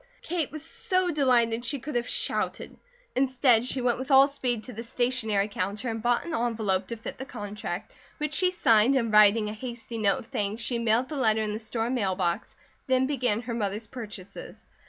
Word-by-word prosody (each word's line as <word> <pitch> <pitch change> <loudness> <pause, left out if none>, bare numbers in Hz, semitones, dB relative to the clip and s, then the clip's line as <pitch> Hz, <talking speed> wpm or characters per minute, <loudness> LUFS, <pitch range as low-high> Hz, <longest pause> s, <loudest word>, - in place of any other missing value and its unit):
Kate 335 -3 -2
was 310 0 -7
so 370 -1 -1
delighted 240 -6 +2
she 250 +4 -1
could 285 +4 -7
have 240 0 -1
shouted. - - -1 0.4
Instead 255 -3 +3
she 255 +1 -1
went 245 -1 +1
with 260 +2 -5
all 270 0 +7
speed 250 -5 -2
to 250 - -9
the 220 - -6
stationery 230 -4 0
counter 205 +3 -3
and 225 0 -3
bought 240 +5 +1
an 340 - -5
envelope 220 -7 0
to 235 - -4
fit 220 - -8
the - - -4
contract, 205 -4 -6 0.2
which 300 0 -3
she 365 +4 +3
signed, 245 -7 +4
and 230 -4 0
writing 210 +1 +6
a 210 - -4
hasty 235 0 -7
note 200 -2 +3
of - - -8
thanks 210 +1 -3
she 235 +1 0
mailed 235 +2 +2
the 305 - -6
letter 220 -5 +3
in 210 -1 -2
the 215 - -4
store 225 +1 -3
mail 200 -7 0
box, 180 +1 -2 0.3
then 260 0 +3
began 250 -6 0
her 240 0 -5
mother's 210 -1 -2
purchases. 210 -5 -9
235 Hz, 200 wpm, -27 LUFS, 215-260 Hz, 0.4 s, all